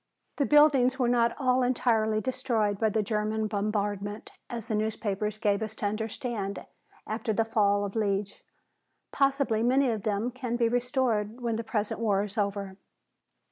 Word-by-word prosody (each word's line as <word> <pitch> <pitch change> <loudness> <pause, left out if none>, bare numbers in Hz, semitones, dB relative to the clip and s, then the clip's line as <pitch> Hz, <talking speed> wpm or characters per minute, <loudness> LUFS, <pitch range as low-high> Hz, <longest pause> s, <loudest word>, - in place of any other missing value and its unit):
The 280 - +1
buildings 280 -4 +5
were 250 - +1
not 235 -1 +2
all 255 -1 +2
entirely 225 -3 +1
destroyed 235 -6 -1
by 220 - +2
the 215 +1 0
German 215 +1 -1
bombardment, 205 0 -2 0.2
as 230 -2 -5
the 225 - -2
newspapers 210 -1 -1
gave 205 -2 +1
us 220 0 -4
to 210 - -4
understand 215 -1 -3 0.4
after 220 0 -2
the 225 +2 +1
fall 205 -2 +2
of 200 - -6
Liege. 200 -2 -1 0.7
Possibly 275 -5 +1
many 255 +2 +3
of 220 -2 -3
them 215 +4 -1
can 250 -2 -4
be 235 -1 +2
restored 245 -2 0
when 235 -2 -1
the 230 - -3
present 215 -1 -2
war 205 -3 +1
is 205 0 -6
over. 200 -2 -2
220 Hz, 160 wpm, -28 LUFS, 205-245 Hz, 0.7 s, buildings